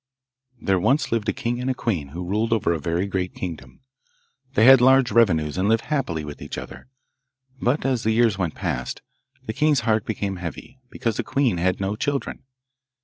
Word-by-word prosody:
There 95 -2 +1
once 130 - +1
lived 115 -2 0
a - - +3
king 120 +1 -3
and 130 - -2
a 130 - 0
queen 90 - -2
who 85 +6 -6
ruled 110 +4 0
over 100 -6 +1
a 80 - -2
very 85 +5 -1
great 95 -2 -3
kingdom. 75 -8 -7 0.7
They 110 - +5
had 135 -1 +9
large 130 0 +5
revenues, 85 -8 +2
and 100 +3 +1
lived 115 0 +2
happily 130 - -2
with 75 -1 -9
each - - -6
other; - - -9 0.7
but, 130 +5 0
as 130 -3 +1
the 110 - 0
years 110 -1 +3
went 90 -5 -2
past, 65 0 -4 0.4
the 110 - -4
king's 150 0 +2
heart 110 -2 +1
became 100 -3 -3
heavy, 90 - -8
because 115 -4 -2
the - - -1
queen 130 -9 +1
had 90 +1 +1
no 95 +1 -1
children. 140 +4 -3
110 Hz, 195 wpm, -23 LUFS, 90-125 Hz, 0.7 s, had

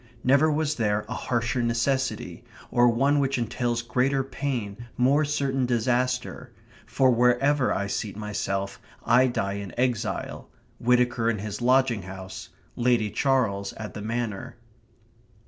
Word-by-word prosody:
Never 140 +4 +4
was 155 0 0
there 105 -2 0
a - - -4
harsher 120 0 -1
necessity! 120 +3 -1 0.3
or 120 0 +5
one 135 +5 +2
which 135 -1 +1
entails 120 0 -1
greater 130 +3 +1
pain, 120 -5 -4
more 135 +5 +3
certain 140 -3 0
disaster; 125 +1 -1 0.4
for 130 -1 +3
wherever 125 +3 +3
I 100 - 0
seat 100 0 -4
myself, 100 -2 -3 0.3
I 125 +3 +5
die 100 -5 -2
in 100 +4 -8
exile: 125 -3 -2 0.3
Whittaker 120 -1 +2
in 115 - 0
his 105 +2 -5
lodging 125 -3 +3
house; 95 0 -9 0.3
Lady 120 -3 +1
Charles 110 -5 0
at 105 -1 -7
the 105 - -7
Manor. 110 -2 -4
120 Hz, 130 wpm, -26 LUFS, 105-130 Hz, 0.4 s, or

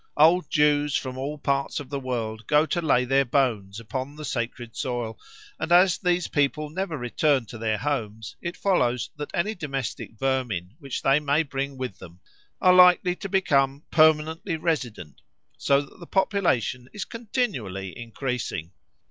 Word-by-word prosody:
Old 170 +4 +5
Jews 150 -1 +3
from 130 -1 -2
all 140 +3 -4
parts 140 -1 -1
of 145 -2 -9
the 140 - -2
world 115 -4 -4
go 150 +1 +4
to 175 +2 -1
lay 125 -6 +3
their 135 +2 +3
bones 115 -7 0
upon 130 +6 -5
the 150 0 -7
sacred 120 -2 -4
soil, 120 -3 -3 0.4
and 160 - -3
as 180 +1 +5
these 180 -1 +1
people 145 +1 0
never 180 -2 -3
return 130 +1 +1
to 110 +2 -10
their 110 -1 0
homes, 110 -7 -3
it 170 0 -5
follows 125 -11 +1
that 150 -1 -5
any 205 +6 0
domestic 135 - -5
vermin 120 -8 -1
which 140 -4 -5
they 135 +2 +4
may 150 +2 +2
bring 140 -1 -4
with 125 -7 -5
them 85 +1 -13 0.4
are 185 - +6
likely 180 0 +6
to 195 - -6
become 140 -7 +2
permanently 160 +2 +3
resident, 125 - -3 0.3
so 140 0 +2
that 145 - -14
the 170 - -10
population 130 - 0
is 210 - -4
continually 130 - -3
increasing. 115 - -4
140 Hz, 160 wpm, -25 LUFS, 120-160 Hz, 0.4 s, are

